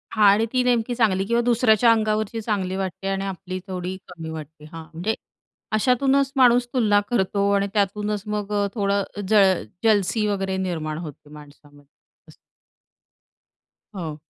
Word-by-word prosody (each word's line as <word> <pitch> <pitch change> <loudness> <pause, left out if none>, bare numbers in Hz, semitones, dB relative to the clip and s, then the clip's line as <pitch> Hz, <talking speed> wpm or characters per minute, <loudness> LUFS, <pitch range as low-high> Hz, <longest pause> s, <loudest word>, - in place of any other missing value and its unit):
हां 215 -1 +4
आणि 220 +2 +2
ती 255 - +3
नेमकी 245 -1 +1
चांगली 200 -5 +2
किंवा 235 +3 +1
दुसऱ्याच्या 235 -1 +4
अंगावरची 215 0 0
चांगली 195 -4 -2
वाटते 190 0 -4
आणि 195 0 -1
आपली 185 -1 -5
थोडी 185 0 -4
कमी 165 -3 -8
वाटते. 155 -1 -9
हां, 160 +1 -9
म्हणजे 180 +7 -2 0.6
अशातूनच 270 +4 +2
माणूस 245 -1 +5
तुलना 210 -5 +3
करतो 200 -3 +1
आणि 200 0 +1
त्यातूनच 210 0 -1
मग 210 -1 -3
अ, 205 -1 +1
थोडं 200 -2 +1 0.3
जळ 195 - +4 0.2
जलसी 215 0 +2
वगैरे 195 -2 -1
निर्माण 160 -5 -3
होते 150 -3 -9
माणसामध्ये. 145 -1 -16 0.4
असं. - - -15 1.6
हो. 160 -5 -5
200 Hz, 145 wpm, -23 LUFS, 180-220 Hz, 1.6 s, माणूस